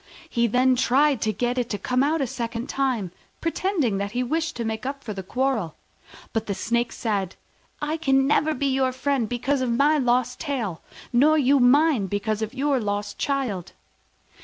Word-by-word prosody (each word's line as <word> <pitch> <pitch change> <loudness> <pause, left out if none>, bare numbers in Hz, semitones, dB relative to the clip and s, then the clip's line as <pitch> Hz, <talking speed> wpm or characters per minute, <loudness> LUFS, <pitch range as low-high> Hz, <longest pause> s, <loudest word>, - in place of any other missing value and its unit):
He 235 -6 +1
then 255 +3 +3
tried 265 +1 +3
to 220 - +1
get 245 +4 -1
it 245 -1 -2
to 205 - -2
come 250 +4 0
out 300 +3 +1
a - - +2
second 235 -1 -4
time, 255 -11 -1 0.3
pretending 330 - 0
that 200 +1 -3
he 250 +1 0
wished 325 +6 -1
to 235 - -3
make 220 0 -3
up 275 +1 -5
the 210 -4 -5
quarrel. 225 - -1 0.6
But 225 -1 -1
the 200 - -2
Snake 235 +4 0
said, 200 -5 -2 0.5
"I 305 +2 -1
can 270 -4 +2
never 300 +2 +2
be 280 - -2
your 265 -1 +1
friend 260 -4 -1
because 260 +3 0
of 255 - 0
my 290 +6 +3
lost 250 -1 +1
tail, 240 - -3 0.3
nor 300 +6 +5
you 280 -1 +4
mine 260 -3 +4
because 205 +2 -2
of 220 - -2
your 280 0 +1
lost 205 -1 -3
child." 255 -11 -2
250 Hz, 185 wpm, -24 LUFS, 220-280 Hz, 0.6 s, nor